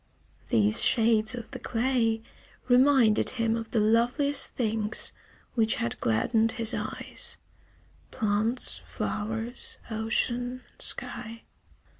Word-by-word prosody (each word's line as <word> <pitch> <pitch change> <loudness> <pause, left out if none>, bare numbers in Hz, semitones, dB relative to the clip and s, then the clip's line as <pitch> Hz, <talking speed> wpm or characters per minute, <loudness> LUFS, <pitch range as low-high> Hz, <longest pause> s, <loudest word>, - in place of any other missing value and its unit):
These 105 -1 +3
shades 225 0 +3
of 240 -2 -8
the - - -7
clay 225 -2 0 0.4
reminded 250 -3 +4
him 230 -1 +1
of 225 -1 -5
the 225 - 0
loveliest 240 +6 +2
things 220 -2 0 0.4
which 225 -3 +2
had 115 - -2
gladdened 220 - +1
his 230 0 +1
eyes: - - -2 0.7
plants, 220 +3 0
flowers, 225 +3 -3
ocean, 240 +3 -1 0.2
sky. 230 +1 -2
225 Hz, 100 wpm, -27 LUFS, 220-245 Hz, 0.7 s, reminded